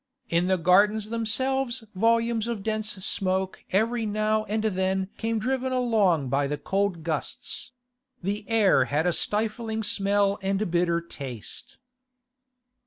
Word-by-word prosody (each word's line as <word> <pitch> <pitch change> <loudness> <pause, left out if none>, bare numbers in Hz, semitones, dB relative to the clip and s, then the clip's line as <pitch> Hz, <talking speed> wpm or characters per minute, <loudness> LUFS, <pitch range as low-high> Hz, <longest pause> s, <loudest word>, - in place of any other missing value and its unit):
In 170 +2 +2
the 190 0 +3
Gardens 205 +5 +3
themselves 235 +2 -1
volumes 230 +2 +2
of 230 -4 -3
dense 215 0 -1
smoke 190 0 -1
every 225 +5 +1
now 215 0 0
and 215 +1 -1
then 190 -2 0
came 225 0 -1
driven 260 +3 -1
along 215 - +2
by 140 +2 +1
the 150 +1 -2
cold 195 0 -1
gusts; 160 - -4 0.5
the 200 +3 -2
air 220 -4 +4
had 150 +3 0
a 180 - +2
stifling 220 +2 -1
smell 200 0 +1
and 195 0 0
a 215 - 0
bitter 170 -1 +1
taste. 135 -9 -8
205 Hz, 135 wpm, -26 LUFS, 185-225 Hz, 0.5 s, air